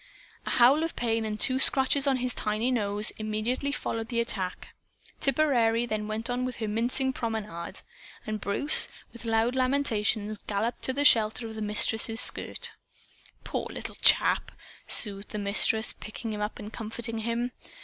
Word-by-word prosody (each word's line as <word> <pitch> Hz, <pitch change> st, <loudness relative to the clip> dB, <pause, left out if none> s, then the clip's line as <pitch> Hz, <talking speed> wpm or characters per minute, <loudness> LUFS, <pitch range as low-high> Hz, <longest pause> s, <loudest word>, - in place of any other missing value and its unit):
A -, -, -1 dB
howl 260 Hz, +5 st, +4 dB
of 330 Hz, 0 st, -3 dB
pain 225 Hz, -2 st, -1 dB
and 215 Hz, 0 st, -4 dB
two 260 Hz, +3 st, +2 dB
scratches 270 Hz, +1 st, +2 dB
on 270 Hz, -2 st, +2 dB
his 250 Hz, -1 st, -3 dB
tiny 215 Hz, +4 st, -2 dB
nose 210 Hz, -3 st, +3 dB
immediately 215 Hz, +6 st, -2 dB
followed 225 Hz, -5 st, -4 dB
the 235 Hz, 0 st, -2 dB
attack. 190 Hz, -6 st, +2 dB, 0.5 s
Tipperary 245 Hz, -5 st, +1 dB
then 215 Hz, -2 st, -4 dB
went 220 Hz, +1 st, -3 dB
on 250 Hz, 0 st, -2 dB
with 255 Hz, -1 st, -4 dB
her 220 Hz, -, -4 dB
mincing 245 Hz, +5 st, -1 dB
promenade. 215 Hz, -8 st, -5 dB, 0.4 s
And 215 Hz, -1 st, -5 dB
Bruce, 285 Hz, +9 st, +5 dB, 0.3 s
with 235 Hz, 0 st, -11 dB
loud 225 Hz, +2 st, 0 dB
lamentations, 220 Hz, -6 st, 0 dB
galloped 215 Hz, +4 st, -3 dB
to 260 Hz, -, -1 dB
the 285 Hz, +2 st, -1 dB
shelter 225 Hz, -1 st, +4 dB
of 225 Hz, -, -7 dB
the 220 Hz, -, -7 dB
Mistress's 220 Hz, +2 st, 0 dB
skirt. -, -, +1 dB, 0.7 s
"Poor -, -, -4 dB
little -, -, -7 dB
chap!" -, -, +2 dB, 0.4 s
soothed 200 Hz, -2 st, +4 dB
the -, -, -6 dB
Mistress, 210 Hz, +2 st, +3 dB
picking 220 Hz, +1 st, -7 dB
him 210 Hz, -, -5 dB
up 210 Hz, +1 st, -4 dB
and 210 Hz, +2 st, -10 dB
comforting 225 Hz, +1 st, -6 dB
him. 235 Hz, +2 st, -3 dB
225 Hz, 160 wpm, -27 LUFS, 215-250 Hz, 0.7 s, Bruce